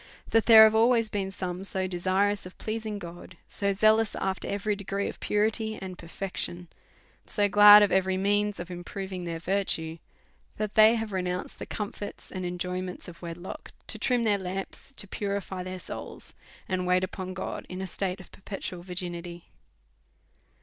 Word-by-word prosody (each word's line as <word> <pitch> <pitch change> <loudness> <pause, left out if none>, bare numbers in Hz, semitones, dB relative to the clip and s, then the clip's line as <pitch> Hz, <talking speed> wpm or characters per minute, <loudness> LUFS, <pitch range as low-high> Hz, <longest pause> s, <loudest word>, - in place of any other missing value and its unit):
That 225 -1 +3
there 220 -2 +11
have 220 0 +6
always 230 0 +4
been 195 -2 -2
some 185 -1 -4
so 190 -1 0
desirous 185 +2 0
of 180 - -14
pleasing 215 -1 -3
God, 175 -1 -10
so 200 0 0
zealous 215 +2 +3
after 190 0 -2
every 205 +1 -1
degree 200 0 -3
of - - -7
purity 220 +1 0
and 185 -1 -6
perfection, 175 0 -5 0.6
so 205 -1 +2
glad 205 +1 +10
of 205 - +2
every 190 0 +2
means 205 +1 +1
of 175 +1 -6
improving 185 +1 -6
their 165 -1 -3
virtue, 165 -3 -1 0.6
that 215 -1 -2
they 220 +1 +7
have 225 -2 -3
renounced 180 -1 -3
the - - -6
comforts 205 -1 -6
and 185 -2 -3
enjoyments 180 +1 -4
of 175 -1 -11
wedlock 170 +1 -8
to - - -5
trim 245 -2 +2
their 205 -3 +2
lamps, 195 +8 -5
to 205 - -5
pu 205 - -5
rify 195 -2 -3
their 185 0 -5
souls, - - -7 0.3
and 185 -1 -1
wait 180 0 +3
upon 185 0 -4
God 190 - -5
in 185 - -6
a 190 - -3
state 185 0 -3
of 185 - -13
perpetual 190 -3 -6
virginity 175 -1 -5
190 Hz, 170 wpm, -28 LUFS, 180-205 Hz, 0.6 s, there